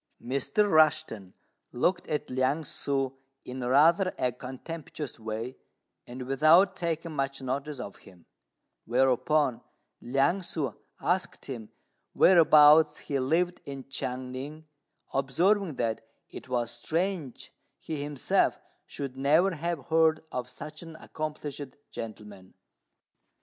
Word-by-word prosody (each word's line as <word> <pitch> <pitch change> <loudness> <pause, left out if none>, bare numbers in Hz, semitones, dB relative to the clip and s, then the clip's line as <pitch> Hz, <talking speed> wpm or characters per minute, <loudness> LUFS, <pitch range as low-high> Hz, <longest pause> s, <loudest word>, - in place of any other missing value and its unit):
Mr. 140 - +1
Rushten 150 - +2 0.4
looked 175 +9 0
at 150 -2 -3
Liang 130 +5 +1
ssŭ 135 -2 -2 0.3
in 125 0 -6
rather 165 +9 +4
a 125 - +1
contemptuous 135 +2 -7
way, 110 +3 -5 0.5
and 125 +1 -7
without 155 +9 +5
taking 165 -2 -3
much 135 -2 -2
notice 140 +2 -3
of 100 -5 -7
him; 90 -3 -18 0.6
whereupon 130 +2 +2 0.4
Liang 135 +9 +2
ssŭ 155 - -3 0.2
asked 185 +1 -1
him 115 -6 -7 0.4
whereabouts 155 -3 +7
he 140 -2 -2
lived 170 +7 0
in 135 -1 -8
Chiang 125 -1 -4
ning, 145 +5 -7 0.5
observing 165 +6 +2
that 115 -3 -1 0.3
it - - -10
was 120 -2 0
strange 160 - -3 0.3
he 155 -3 -5
himself 145 -3 +1 0.3
should 135 -2 -6
never 155 +8 +3
have 165 -3 -3
heard 160 -1 +3
of 125 -1 -4
such 150 +4 -9
an 165 -1 -10
accomplished 150 -2 -5 0.3
gentleman. 105 -4 -9
140 Hz, 115 wpm, -28 LUFS, 125-160 Hz, 0.6 s, whereabouts